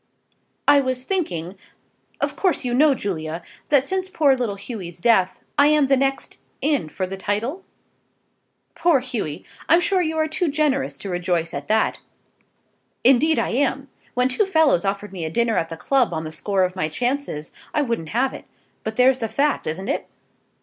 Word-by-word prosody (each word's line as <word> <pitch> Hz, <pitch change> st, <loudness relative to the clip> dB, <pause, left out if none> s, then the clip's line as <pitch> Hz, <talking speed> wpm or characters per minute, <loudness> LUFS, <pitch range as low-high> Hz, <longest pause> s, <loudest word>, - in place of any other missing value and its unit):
"I 285 Hz, -, +7 dB
was 260 Hz, -2 st, -1 dB
thinking, 195 Hz, -, -2 dB, 0.6 s
of -, -, -1 dB
course 365 Hz, -8 st, 0 dB
you 245 Hz, -, -1 dB
know, 285 Hz, +2 st, +5 dB
Julia, 165 Hz, -6 st, -4 dB, 0.3 s
that 285 Hz, -3 st, +5 dB
since 375 Hz, +5 st, -2 dB
poor 290 Hz, -7 st, +3 dB
little 240 Hz, -6 st, -2 dB
Hughy's 195 Hz, -5 st, -7 dB
death, 190 Hz, -2 st, +2 dB, 0.2 s
I 285 Hz, -, +7 dB
am 300 Hz, -1 st, +4 dB
the 270 Hz, 0 st, +4 dB
next 270 Hz, +1 st, -1 dB, 0.2 s
in 285 Hz, -, 0 dB
for 185 Hz, +5 st, -3 dB
the 190 Hz, +1 st, -6 dB
title?" 230 Hz, -, -2 dB, 1.1 s
"Poor 340 Hz, -5 st, +3 dB
Hughy! 210 Hz, -, -4 dB, 0.2 s
I'm 335 Hz, +3 st, +7 dB
sure 375 Hz, +1 st, +1 dB
you 320 Hz, -2 st, -1 dB
are 315 Hz, 0 st, +2 dB
too 335 Hz, +3 st, -1 dB
generous 285 Hz, -2 st, 0 dB
to 200 Hz, -, -7 dB
rejoice 175 Hz, -2 st, -1 dB
at 140 Hz, 0 st, -5 dB
that." 220 Hz, 0 st, +1 dB, 1.0 s
"Indeed 270 Hz, +5 st, +5 dB
I -, -, +1 dB
am. 275 Hz, +1 st, 0 dB, 0.3 s
When 250 Hz, +1 st, +3 dB
two 320 Hz, +11 st, +1 dB
fellows 315 Hz, -, +3 dB
offered 200 Hz, +1 st, -2 dB
me 180 Hz, -3 st, -5 dB
a 160 Hz, -, -2 dB
dinner 230 Hz, +6 st, +1 dB
at 165 Hz, -, -3 dB
the 165 Hz, -, -6 dB
club 245 Hz, +1 st, +1 dB
on 160 Hz, -, -3 dB
the 155 Hz, -, -6 dB
score 190 Hz, +4 st, 0 dB
of 185 Hz, 0 st, -1 dB
my 155 Hz, -4 st, -1 dB
chances, 245 Hz, -, -2 dB, 0.2 s
I 300 Hz, -, +1 dB
wouldn't 230 Hz, -, -3 dB
have 255 Hz, +4 st, +1 dB
it. -, -, -9 dB, 0.4 s
But 220 Hz, 0 st, -4 dB
there's 255 Hz, +2 st, +4 dB
the 225 Hz, -, -1 dB
fact; 285 Hz, +6 st, 0 dB
isn't 185 Hz, +6 st, -3 dB
it?" 285 Hz, -, -2 dB
245 Hz, 185 wpm, -22 LUFS, 185-285 Hz, 1.1 s, I